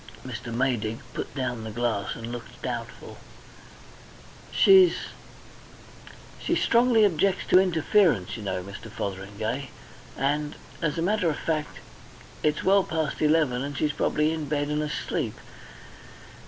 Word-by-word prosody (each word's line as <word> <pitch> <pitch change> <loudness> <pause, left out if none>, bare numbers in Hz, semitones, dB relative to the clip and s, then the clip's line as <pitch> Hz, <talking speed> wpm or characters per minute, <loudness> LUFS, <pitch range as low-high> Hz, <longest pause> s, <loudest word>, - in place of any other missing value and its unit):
Mr. 120 - -6
Maydig 115 -3 0 0.2
put - - -5
down 120 -4 -2
the 110 - -5
glass 110 -3 -1
and 115 +1 -7
looked 120 -1 -8
doubtful. - - -6 1.3
"She's 380 -2 +7 1.4
She - - 0
strongly 235 -2 +4
objects 190 +1 +1
to 185 - +7
interference, 170 - +2
you 110 - -7
know, 95 -3 -3
Mr. 100 +4 -9
Fotheringay. 105 +5 -4 0.5
And 145 +2 0 0.3
as 150 -2 0
a 165 - 0
matter 190 -2 +2
of 150 - -2
fact 155 -2 -2 0.6
it's 150 -1 0
well 195 0 +5
past 160 -4 -2
eleven 150 -5 +3
and 140 0 -4
she's 150 -1 0
probably 155 +1 +1
in 155 -3 -4
bed 145 -1 0
and 150 0 0
asleep. 150 0 -2
145 Hz, 130 wpm, -26 LUFS, 115-165 Hz, 1.4 s, She's